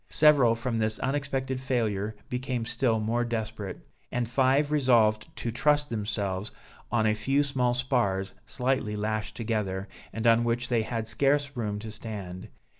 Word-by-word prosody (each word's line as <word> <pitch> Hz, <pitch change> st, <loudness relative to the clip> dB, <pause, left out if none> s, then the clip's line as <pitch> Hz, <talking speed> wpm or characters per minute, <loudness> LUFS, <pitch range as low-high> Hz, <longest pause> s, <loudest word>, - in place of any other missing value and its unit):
Several 145 Hz, -7 st, +6 dB
from 115 Hz, 0 st, -2 dB
this 110 Hz, 0 st, 0 dB
unexpected 135 Hz, -1 st, -1 dB
failure 110 Hz, -5 st, -1 dB
became 125 Hz, -2 st, -2 dB
still 115 Hz, -1 st, +1 dB
more 115 Hz, +3 st, 0 dB
desperate, 110 Hz, -4 st, -4 dB, 0.3 s
and 125 Hz, -2 st, -1 dB
five 135 Hz, +4 st, +2 dB
resolved 115 Hz, -7 st, +3 dB
to 115 Hz, -, -3 dB
trust 145 Hz, +4 st, +2 dB
themselves 105 Hz, -2 st, -2 dB, 0.4 s
on 115 Hz, -1 st, +2 dB
a 105 Hz, -, +4 dB
few 135 Hz, +7 st, +1 dB
small 125 Hz, -3 st, +1 dB
spars 120 Hz, -7 st, 0 dB
slightly 125 Hz, -5 st, 0 dB
lashed 110 Hz, 0 st, -2 dB
together, 105 Hz, -4 st, -2 dB, 0.2 s
and 110 Hz, 0 st, -4 dB
on 115 Hz, 0 st, +5 dB
which 120 Hz, +1 st, -1 dB
they 120 Hz, -2 st, +2 dB
had 110 Hz, 0 st, -3 dB
scarce 140 Hz, +5 st, +1 dB
room 105 Hz, -4 st, -2 dB
to 110 Hz, +1 st, -7 dB
stand. 100 Hz, -5 st, -7 dB
115 Hz, 150 wpm, -28 LUFS, 110-130 Hz, 0.4 s, Several